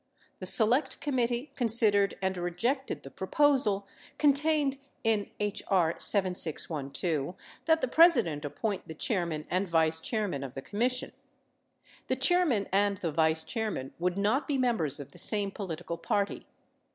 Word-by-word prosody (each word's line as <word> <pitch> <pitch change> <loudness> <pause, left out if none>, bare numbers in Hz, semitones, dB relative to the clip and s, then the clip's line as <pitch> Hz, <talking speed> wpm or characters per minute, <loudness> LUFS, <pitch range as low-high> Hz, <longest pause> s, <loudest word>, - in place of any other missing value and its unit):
The - - -1
Select 240 +6 +2
Committee 250 -2 -1
consid 230 -3 +4
ered 200 -1 +2
and 190 0 0
rejected 180 - -2
the 135 - -10
proposal 210 -3 +2 0.3
(contained 290 -1 +2 0.2
in 220 -3 +1
H.R. 195 -5 +1
7612) 165 -4 0 0.3
that 320 0 +3
the - - +1
Presi 325 -2 +6
dent 150 -4 -5
appoint 195 +7 -3
the 160 - -8
chairman 170 -5 -2
and 185 +2 0
vice 160 -1 +2
chairman 195 - -2
of 130 -2 -8
the 135 - -5
Commission. 245 +4 -1 1.0
The 260 - +1
chairman 270 - +2
and 200 +1 +2
the 170 -3 -3
vice 160 +1 +2
chairman 215 - -4
would 180 +2 0
not 210 +8 +1
be 285 -3 0
members 225 - 0
of 140 0 -9
the 175 - -10
same 200 +2 0
political 170 -4 -5
party. 200 +3 -1
200 Hz, 145 wpm, -29 LUFS, 170-250 Hz, 1.0 s, Presi